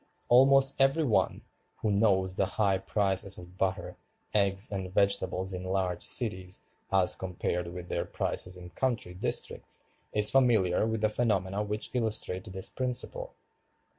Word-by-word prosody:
Almost 135 +2 +5
every 135 +4 +3
one, 120 -8 +1 0.4
who 110 - +1
knows 95 -3 +2
the 95 - +1
high 100 -3 +2
prices 95 -1 0
of 90 0 -11
butter, 95 0 -2 0.4
eggs, 100 -1 +1
and 95 -2 -4
vegetables 95 -1 0
in 90 0 -5
large 95 -1 -1
cities 95 -6 -1 0.3
as 95 -2 +4
compared 90 -1 -3
with 90 0 -8
their - - -2
prices 90 0 -2
in 90 -1 -10
country 115 - -2
districts, 90 - -1 0.3
is 105 0 +4
familiar 110 -7 +3
with 110 -1 -2
the 110 - +3
phenomena 105 -3 0
which 105 +1 -4
illustrate 110 -6 0
this 95 0 -2
principle. 130 - -1
100 Hz, 140 wpm, -29 LUFS, 95-110 Hz, 0.4 s, Almost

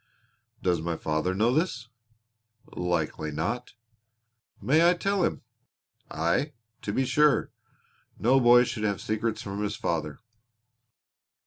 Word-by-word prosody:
"Does 90 -3 +1
my 85 0 -2
father 80 +5 -1
know 115 +5 +2
this?" 155 -6 -1 0.9
"Likely 85 -3 -2
not." 115 +13 -3 0.9
"May 160 +5 +4
I 180 - +3
tell 195 +2 0
him?" - - -1 0.7
"Aye, 85 - 0 0.3
to 100 - -3
be 130 +5 0
sure. 150 +2 +3 0.7
No 130 +4 +4
boy 120 0 +7
should 120 -3 -4
have 100 -4 0
secrets 110 +2 -2
from 100 +1 -5
his 105 - -2
father." 75 -3 -2
110 Hz, 120 wpm, -27 LUFS, 85-130 Hz, 0.9 s, boy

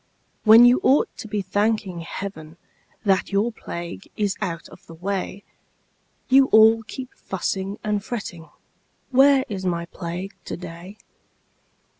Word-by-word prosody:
When 225 +2 +9
you 245 +1 +6
ought 275 - +3
to - - -7
be 210 -2 -2
thanking 205 -1 -1
Heaven 165 -2 -7 0.5
That 195 0 +2
your 205 +4 +1
plague 170 - -7
is 205 -2 0
out 170 -5 -4
of - - -16
the 165 - -11
way, 195 +2 -4 0.8
You 265 +1 +6
all 220 0 +6
keep 255 +3 -8
fussing 190 +1 -4
and 210 -1 -1
fretting 190 -8 -6 0.6
"Where 270 +1 +5
is 195 -4 -5
my 170 -2 -1
Plague 180 +3 -6
to - - -5
day?" 175 +3 -10
200 Hz, 135 wpm, -23 LUFS, 175-220 Hz, 0.8 s, When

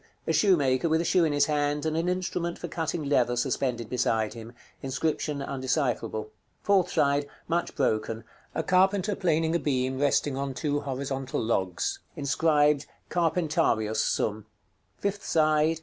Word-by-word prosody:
_ - - -34 0.2
A - - 0
shoemaker 155 -7 +3
with 160 +1 +3
a 170 - -1
shoe 175 0 +3
in 155 - +1
his 145 0 +3
hand, 145 0 0
and 160 0 0
an 165 +2 0
instrument 180 -2 -2
for 175 - -6
cutting 165 -1 -3
leather 125 -4 +2
suspended 120 -2 -1
beside 115 -3 0
him. 115 0 -9 0.3
Inscription 140 +1 -2
undecipherable. 130 -5 -2 0.3
Fourth 190 -3 +3
side. 140 0 +2 0.2
Much 170 +1 -1
broken. 110 -3 0 0.3
A - - 0
carpenter 195 +2 +2
planing 165 -2 +1
a - - +2
beam 130 -3 -1
resting 145 0 +2
on 135 -1 -3
two 145 +1 -1
horizontal 135 -1 -3
logs. 95 -6 -1 0.2
Inscribed 150 0 +2 0.2
"CARPENTARIUS 160 -10 +1
SUM." 110 0 -1 0.5
_Fifth 200 0 -2
side. 155 0 +2
145 Hz, 150 wpm, -27 LUFS, 130-165 Hz, 0.5 s, shoemaker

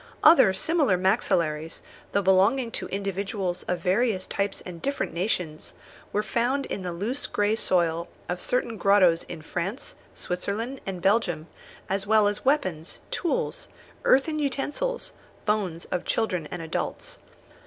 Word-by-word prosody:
Other 270 - +8
similar 275 - +2
maxillaries, 170 -5 +1 0.3
though 200 - +1
belonging 200 +7 +4
to - - -3
individuals 195 -2 -2
of 180 -1 -1
various 190 +1 +1
types 200 0 -2
and 170 -2 -8
different 280 0 -2
nations, 170 -4 -2 0.4
were 210 - +1
found 245 +6 0
in - - -4
the 180 -1 -3
loose 215 +11 -2
grey 205 +1 +1
soil 170 -5 +1 0.2
of 180 0 -3
certain 240 -2 0
grottoes 190 -4 +5
in 165 -3 -8
France, 195 - -4 0.2
Switzerland, 215 +9 -3
and 185 -3 -4
Belgium, 190 -6 +2 0.4
as 195 +1 0
well 215 -1 +5
as 205 0 -2
weapons, 185 - 0
tools, 345 - -1 0.4
earthen 305 +4 +3
utensils, 295 - -2 0.3
bones 195 -6 0
of 180 - -1
children 180 -8 0
and 175 -2 -5
adults. 160 - -3
195 Hz, 135 wpm, -26 LUFS, 180-235 Hz, 0.4 s, Other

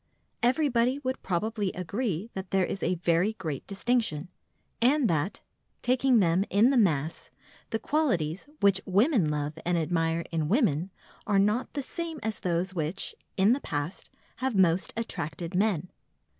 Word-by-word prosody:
Everybody 255 -1 +2
would 260 -2 -3
probably 205 +2 -1
agree 200 +2 -3
that 190 -1 -6
there 190 -1 +2
is 195 - -4
a 180 - +1
very 175 +4 +1
great 155 -10 -5
distinction, 200 -6 0 0.5
and 265 +2 +4
that, 165 +1 -1 0.4
taking 255 0 +3
them 180 -2 +3
in 220 +6 +4
the - - +2
mass, 160 - +1 0.4
the 225 - 0
qualities 200 - 0
which 200 -1 +4
women 200 - +3
love 150 +1 -3
and 175 0 +1
admire 165 0 0
in 160 -2 -1
women 190 - +2 0.4
are 205 - +3
not 210 +5 +1
the 285 - -2
same 330 +2 -4
as 220 -2 -2
those 180 +1 -1
which, 165 +2 -2 0.2
in 200 +4 +5
the 275 - -2
past, 145 +4 -4 0.3
have 260 -3 -1
most 185 -1 +3
attracted 165 -6 -4
men. 185 -3 +1
195 Hz, 150 wpm, -28 LUFS, 165-235 Hz, 0.5 s, in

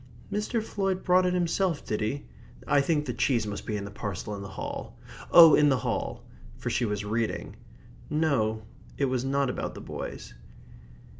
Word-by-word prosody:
"Mr. 215 +2 -1
Floyd 195 -3 -2
brought 180 0 +4
it 180 - +1
himself, 175 -1 0
did 105 - -2
he? 110 +7 -2 0.4
I 145 - +4
think 150 +1 +1
the 125 - -3
cheese 120 -4 +1
must 105 -1 -6
be 105 - -1
in 100 - -5
the 100 - -8
parcel 100 0 -5
in 100 - -5
the 100 - -6
hall 95 - -6 0.3
oh, 165 -3 +10
in 150 -1 +6
the 135 - +3
hall 110 - -3 0.2
" - - -19
for - - -3
she 120 - +1
was 105 -1 -2
reading. 110 +2 -2 0.5
No, 130 -9 +1 0.3
it 140 - +2
was 130 -2 0
not 140 +1 +1
about - - -4
the - - -8
boys. - - -7
135 Hz, 190 wpm, -28 LUFS, 110-165 Hz, 0.5 s, oh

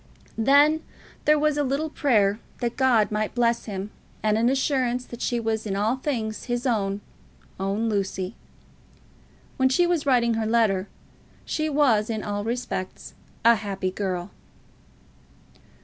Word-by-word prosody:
Then 285 +6 +5 0.4
there 300 0 +5
was 300 0 +1
a - - +2
little 285 +3 -1
prayer 215 -9 +2 0.2
that 240 -2 -2
God 245 -6 +3
might 215 +1 -2
bless 235 -1 +1
him, 200 -1 -5 0.3
and 215 -1 +2
an 230 +2 +3
assurance 260 -2 0
that 240 - -10
she 240 - 0
was 220 -1 -2
in 195 - -2
all 215 +5 +1
things 230 -6 -3
his 245 0 -2
own, 205 -5 0 0.6
own 200 +4 -1
Lucy. 195 -1 -2 1.2
When 260 0 +3
she 350 +7 +3
was 345 -4 0
writing 240 -3 +3
her 220 -1 -1
letter 215 -4 +2 0.6
she 310 0 -1
was 255 -8 +3
in 220 -2 -2
all 205 0 -3
respects 230 -5 -4 0.3
a 235 - +8
happy 195 -3 -3
girl. 185 -1 -3
230 Hz, 145 wpm, -25 LUFS, 205-260 Hz, 1.2 s, a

